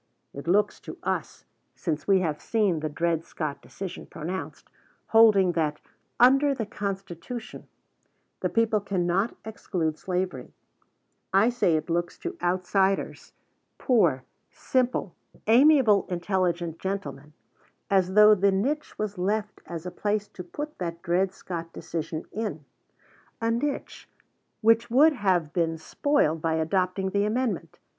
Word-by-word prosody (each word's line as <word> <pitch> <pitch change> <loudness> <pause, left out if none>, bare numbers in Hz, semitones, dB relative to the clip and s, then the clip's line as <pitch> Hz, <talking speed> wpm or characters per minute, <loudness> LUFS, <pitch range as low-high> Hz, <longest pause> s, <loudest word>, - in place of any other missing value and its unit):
It 140 +3 -8
looks 205 +4 +2
to - - -9
us, - - -3 0.3
since 155 -3 -3
we 195 -2 +4
have 155 -4 -2
seen 205 -7 +1
the 155 0 -3
Dred 165 +2 0
Scott 145 -4 -5
decision 190 -2 -8
pronounced, 170 +4 -6 0.4
holding 215 -5 +6
that 155 -3 -1 0.4
"under 275 +3 +5
the 225 - -3
Constitution" 200 +2 -6 0.7
the - - -1
people 225 -2 +2
cannot 190 +2 0
exclude 175 -7 -3
slavery 180 -8 -3 0.8
I 195 +5 +4
say 240 -9 +2
it 155 - -2
looks 170 0 -1
to 355 +1 -5
outsiders, 190 +2 0 0.4
poor, 170 - +2 0.3
simple, 250 -7 -1 0.3
"amiable, 235 -4 +5
intelligent 175 -2 -1
gentlemen," 150 -7 -5 0.5
as 190 -1 +2
though 210 0 +8
the 200 0 +3
niche 270 +11 -1
was 210 -3 -3
left 210 +3 -1
as 170 0 -6
a 180 - -4
place 210 +1 -1
to 185 - -9
put 295 - -7
that 170 -1 -4
Dred 180 +2 +1
Scott 170 -3 -7
decision 165 -1 -5
in, 195 -10 -4 0.7
a 230 0 0
niche 275 +5 -3 0.5
which 230 +1 +4
would 295 +7 +6
have 185 - 0
been 165 -2 0
spoiled 165 - +1
by 160 0 0
adopting 185 +4 0
the 200 +1 +1
amendment. 225 -3 -2
190 Hz, 130 wpm, -26 LUFS, 170-220 Hz, 0.8 s, though